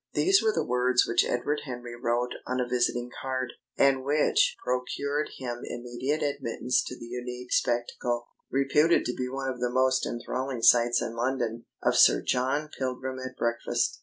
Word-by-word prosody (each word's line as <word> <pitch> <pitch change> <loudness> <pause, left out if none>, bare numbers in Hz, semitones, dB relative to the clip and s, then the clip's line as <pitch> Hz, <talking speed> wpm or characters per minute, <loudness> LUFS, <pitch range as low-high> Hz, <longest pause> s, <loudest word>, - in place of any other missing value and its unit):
These 390 +1 +4
were 440 - +3
the - - -1
words 125 0 +3
which 115 - +3
Edward 145 +5 -1
Henry 120 -2 -6
wrote 120 +1 -1
on 130 +1 -1
a 125 - 0
visiting 120 0 0
card, 130 -2 -3 0.2
and 135 -1 +4
which 145 +2 +3
procured 140 +4 -1
him 120 -2 -5
immediate 120 +5 -3
admittance 130 -3 0
to 125 - -6
the - - -9
unique 125 +1 -6
spectacle 120 0 0 0.2
reputed 150 +5 +3
to 125 - -1
be 125 0 -3
one 135 0 -3
of 125 - -12
the 125 0 0
most 130 +1 +2
enthralling 125 +1 -4
sights 120 0 +5
in 115 - -4
London 120 -1 -2 0.2
of - - +2
Sir - - +6
John 135 +4 0
Pilgrim 130 0 -3
at 130 0 -7
breakfast. 115 0 -1
125 Hz, 165 wpm, -28 LUFS, 120-135 Hz, 0.2 s, Sir